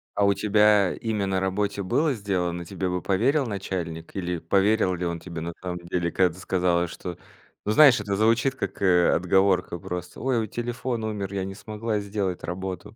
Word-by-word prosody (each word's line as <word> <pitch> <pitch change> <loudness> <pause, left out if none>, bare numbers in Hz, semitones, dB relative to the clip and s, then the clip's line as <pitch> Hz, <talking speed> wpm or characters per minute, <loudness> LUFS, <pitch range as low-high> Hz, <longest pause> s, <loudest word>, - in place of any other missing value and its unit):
А 100 - +3
у 100 - +4
тебя 105 -2 +4
имя 110 -3 -2
на 95 -1 0
работе 100 +1 -1
было 140 - +1
сделано? 90 -5 -2
Тебе 95 +1 -3
бы 90 -1 -2
поверил 130 +9 +1
начальник? 90 -5 -5
Или 90 -2 -2
поверил 95 +3 +2
ли 90 0 -3
он 85 0 -2
тебе 85 -1 -7
на 85 0 -4
самом 90 -1 -4
деле? 85 0 -2
Когда 90 -3 +2
ты 90 - -13
сказала, 90 -2 +1
что: 90 +1 -7 0.5
ну 105 - +1
знаешь, 135 -2 +7
это 100 -1 -2
звучит 115 +5 +3
как, 130 - -5
э, 90 -2 +4
отговорка 90 -1 +2
просто. 90 +3 -6
Ой, 130 -2 +1
вот 110 - -5
телефон 120 -1 -3
умер, 100 -3 -3
я 95 -1 -2
не 95 0 -6
смогла 110 0 -3
сделать 100 -3 -3
работу. 95 +3 -5
95 Hz, 190 wpm, -25 LUFS, 90-105 Hz, 0.5 s, знаешь